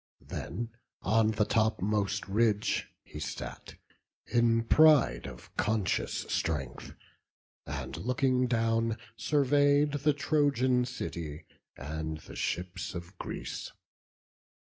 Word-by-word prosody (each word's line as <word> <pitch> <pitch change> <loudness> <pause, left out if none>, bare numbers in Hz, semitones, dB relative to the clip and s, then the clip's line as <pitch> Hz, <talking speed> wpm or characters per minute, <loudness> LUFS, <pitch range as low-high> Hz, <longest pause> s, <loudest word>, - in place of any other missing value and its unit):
Then 115 0 -4 0.3
on 110 0 +3
the 110 -1 +1
topmost 105 -3 +1
ridge 105 +1 +1 0.2
he 75 - -9
sat, 75 - -6 0.5
in 115 -1 +3
pride 125 - +5
Of - - -12
conscious 105 -3 0
strength; 70 -7 -3 0.7
and - - -4
looking 125 +1 +1
down, 115 -1 +1 0.2
survey'd 145 +2 +3
The 150 +1 +3
Trojan 140 -4 +2
city, 80 -9 -5 0.3
and 80 +3 -4
the - - -12
ships 90 +1 -3
of 85 +2 -7
Greece. - - -5
115 Hz, 100 wpm, -30 LUFS, 90-125 Hz, 0.7 s, pride